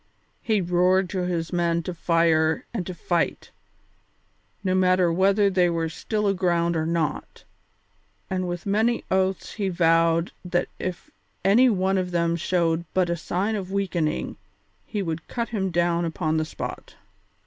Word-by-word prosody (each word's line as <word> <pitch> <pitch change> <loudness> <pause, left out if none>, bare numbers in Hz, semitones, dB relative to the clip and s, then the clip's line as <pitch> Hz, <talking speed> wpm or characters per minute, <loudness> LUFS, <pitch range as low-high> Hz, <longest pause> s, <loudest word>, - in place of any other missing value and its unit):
He 215 -3 +1
roared 180 +1 +2
to 185 -3 -1
his 170 -1 -2
men 170 -1 +1
to 180 - -4
fire 165 -2 +2
and 190 -7 -3
to 185 - -4
fight, 170 0 -1 1.1
no 185 -1 +1
matter 185 -2 +3
whether 200 +3 +3
they 180 -2 +3
were 165 -1 -1
still 210 +6 -2
aground 175 -3 +1
or 160 0 0
not, 165 -2 -2 0.8
and 185 -1 -2
with 175 0 -5
many 220 +4 +1
oaths 190 0 0
he 200 -3 -2
vowed 165 -1 +2
that 175 -1 -1
if 185 -1 -5 0.3
any 235 +7 +6
one 190 -2 +1
of 180 -1 -2
them 170 -1 +1
showed 170 -1 0
but 180 -2 +2
a - - +1
sign 190 +6 -2
of 190 -2 -5
weakening 180 -6 -1 0.5
he 205 -3 -2
would 165 -1 -4
cut 235 -1 -3
him 195 -5 -1
down 170 0 +1
upon 160 -1 -1
the 155 - 0
spot. 155 - -7
180 Hz, 155 wpm, -24 LUFS, 170-190 Hz, 1.1 s, any